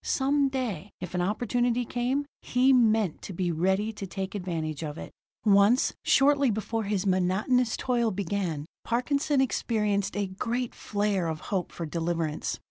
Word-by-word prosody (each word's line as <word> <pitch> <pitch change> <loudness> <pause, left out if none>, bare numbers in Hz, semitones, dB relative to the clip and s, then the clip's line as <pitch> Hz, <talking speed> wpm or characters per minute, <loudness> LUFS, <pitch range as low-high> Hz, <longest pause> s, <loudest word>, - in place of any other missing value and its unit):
Some 280 +1 +2
day, 230 - -3
if 180 -1 -7
an 180 - 0
opportunity 240 +5 0
came, 250 +5 -1 0.2
he 255 +2 +3
meant 220 -7 +3
to 195 - -7
be 175 0 -1
ready 190 +6 +1
to 200 -2 -6
take 190 +1 -5
advantage 165 -6 -3
of 150 -1 -5
it. - - -8 0.3
Once, 205 +4 +5
shortly 280 -1 +4
after 225 +1 -2
his 205 -2 -1
monotonous 195 +6 +2
toil 240 -3 +1
began, 185 -6 -2 0.2
Parkinson 280 +4 +1
experienced 210 -6 0
a 205 - +1
great 235 +6 -3
flare 205 -4 -1
of 160 -1 -3
hope 185 -2 -1
for 170 - -5
deliverance. 165 -1 -2
205 Hz, 150 wpm, -28 LUFS, 180-245 Hz, 0.3 s, Once